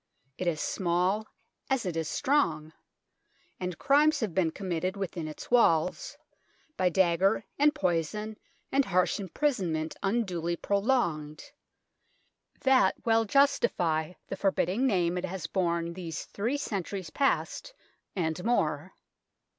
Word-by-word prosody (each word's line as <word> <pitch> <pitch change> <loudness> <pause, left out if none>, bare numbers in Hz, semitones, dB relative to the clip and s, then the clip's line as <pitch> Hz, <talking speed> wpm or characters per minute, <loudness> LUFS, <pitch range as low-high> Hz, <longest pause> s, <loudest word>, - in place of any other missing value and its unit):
It 185 - -2
is 160 -3 0
small 185 +6 0 0.4
as 265 -5 +1
it 180 -3 -2
is 165 -1 -1
strong, 160 - 0 0.9
and 180 -2 -4
crimes 300 +3 +4
have 210 -7 -2
been 170 -1 +2
committed 185 +1 -3
within 175 -4 -4
its 155 - -9
walls, 230 - +2 0.6
by 185 -1 +2
dagger 190 +2 +2
and 295 +1 +4
poison 210 - -1 0.3
and 275 +1 +3
harsh 185 +2 +1
imprisonment 185 - -1
unduly 185 -5 -1
prolonged, 175 - -1 1.1
that 260 -8 +4
well 225 -1 +3
justify 180 - +2
the - - -5
forbidding 195 +5 +1
name 180 -5 +1
it 180 - -3
has 185 -2 -5
borne 170 -2 -1
these 170 -2 -6
three 235 +8 -2
centuries 195 - -4
past 280 - -1 0.4
and 160 -2 -2
more. 185 -8 0
185 Hz, 120 wpm, -29 LUFS, 170-225 Hz, 1.1 s, crimes